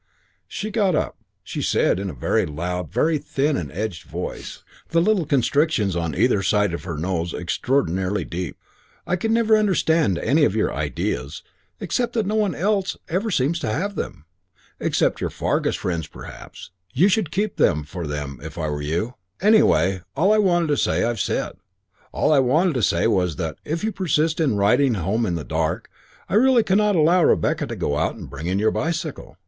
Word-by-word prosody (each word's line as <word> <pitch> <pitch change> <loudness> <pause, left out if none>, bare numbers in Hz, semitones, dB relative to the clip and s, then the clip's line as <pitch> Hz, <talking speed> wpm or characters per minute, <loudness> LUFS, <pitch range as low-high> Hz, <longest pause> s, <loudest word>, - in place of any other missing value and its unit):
She 215 +1 -5
got 200 -6 +2
up. - - -1 0.3
She - - -5
said - - +2
in 100 0 -3
a - - -6
very - - 0
loud, 90 +3 -4
very 150 - +1
thin 140 +2 0
and 75 - -4
edged 95 0 -4
voice, - - -6 0.3
the 165 - +2
little 180 -3 +2
constrictions 140 - +1
on 85 -4 -2
either 95 - +2
side 105 0 +1
of 85 - -5
her 85 -5 -4
nose 85 +1 -2
extraordinarily 95 0 -1
deep: 90 -2 -5 0.5
"I 180 - 0
never 225 0 +2
can 215 - +6
understand 160 - +2
any - - +2
of - - +2
your - - +1
ideas, 70 0 -3 0.4
except 245 -1 -1
that 225 -3 0
no 205 - -1
one 210 -6 +1
else 195 +2 0
ever 190 +7 -1
seems 165 -1 +1
to 110 - -2
have 195 - -2
them. 75 - -6 0.5
Except - - 0
your - - -1
Fargus - - -1
friends 85 -4 -3
perhaps. - - -11 0.3
I 180 - +7
should 200 -3 +2
keep 205 +4 -2
them 75 -3 +2
for 80 +3 -6
them 75 -2 -5
if - - -9
I 80 -2 -2
were 75 0 -3
you. 85 +11 -2 0.3
Anyway, 95 - +4 0.2
all 190 +8 +4
I 215 - +3
wanted 175 -5 +2
to 145 - +2
say - - +1
I've 120 -2 -1
said. - - -2 0.5
All - - +2
I 145 - +5
wanted 155 +7 +3
to 125 - -1
say 85 -4 +2
was 90 -7 +1
that, 80 -4 -4
if 165 +5 -3
you 220 - 0
persist 160 -4 0
in 140 -10 +2
riding 125 +5 +3
home 105 +5 0
in 85 - -1
the 80 - -4
dark, 80 +1 -2 0.4
I - - -6
really 245 +2 +5
cannot 210 +1 +2
allow 170 +2 +4
Rebecca - - +2
to - - -5
go 70 0 -1
out - - 0
and - - -9
bring 80 - -7
in 95 +2 0
your 110 +2 +2
bicycle. 165 +1 -3
125 Hz, 195 wpm, -22 LUFS, -, 0.5 s, I